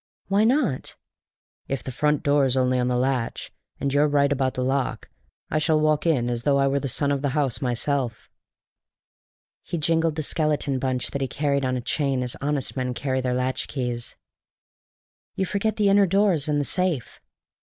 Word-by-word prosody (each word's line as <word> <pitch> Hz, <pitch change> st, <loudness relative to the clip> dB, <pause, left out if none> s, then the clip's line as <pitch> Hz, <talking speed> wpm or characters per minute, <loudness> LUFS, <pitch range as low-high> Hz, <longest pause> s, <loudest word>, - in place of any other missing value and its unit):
"Why 200 Hz, +2 st, +3 dB
not?" 240 Hz, -, +1 dB, 0.7 s
"If 135 Hz, -3 st, -3 dB
the 130 Hz, -, -5 dB
front 150 Hz, +3 st, +1 dB
door's 140 Hz, -3 st, +2 dB
only 130 Hz, 0 st, +2 dB
on 125 Hz, -, +1 dB
the 125 Hz, 0 st, +1 dB
latch, 125 Hz, -2 st, -1 dB, 0.3 s
and 140 Hz, -1 st, -1 dB
you're 145 Hz, +1 st, +4 dB
right 140 Hz, -1 st, +2 dB
about 130 Hz, -2 st, 0 dB
the 125 Hz, -, -1 dB
lock, 135 Hz, 0 st, -1 dB, 0.4 s
I 155 Hz, -, +2 dB
shall 155 Hz, 0 st, +2 dB
walk 155 Hz, +1 st, +2 dB
in 130 Hz, -7 st, +2 dB
as 120 Hz, -1 st, -1 dB
though 140 Hz, +3 st, +2 dB
I 135 Hz, -, +3 dB
were 140 Hz, +1 st, +1 dB
the 140 Hz, -, -3 dB
son 140 Hz, +3 st, 0 dB
of 140 Hz, -1 st, 0 dB
the 145 Hz, 0 st, -1 dB
house 140 Hz, -2 st, 0 dB
myself." 125 Hz, -1 st, -1 dB, 1.3 s
And -, -, -29 dB
he -, -, +2 dB
jingled 165 Hz, 0 st, +1 dB
the 155 Hz, -, -2 dB
skeleton 150 Hz, -3 st, +1 dB
bunch 130 Hz, -1 st, -2 dB
that 140 Hz, -, -3 dB
he 135 Hz, -, 0 dB
carried 140 Hz, 0 st, 0 dB
on 130 Hz, -1 st, 0 dB
a -, -, -3 dB
chain 135 Hz, 0 st, -1 dB
as 125 Hz, -, -3 dB
honest 145 Hz, -1 st, -1 dB
men 125 Hz, -2 st, -2 dB
carry 130 Hz, 0 st, -1 dB
their 125 Hz, -1 st, -1 dB
latchkeys. 125 Hz, -1 st, -3 dB, 1.2 s
"You 190 Hz, -, 0 dB
forget 205 Hz, +3 st, -1 dB
the 205 Hz, -2 st, +2 dB
inner 200 Hz, 0 st, +5 dB
doors 190 Hz, -5 st, +2 dB
and 150 Hz, -1 st, +1 dB
the 145 Hz, -, -1 dB
safe." 175 Hz, -, -1 dB
140 Hz, 190 wpm, -24 LUFS, 130-155 Hz, 1.3 s, inner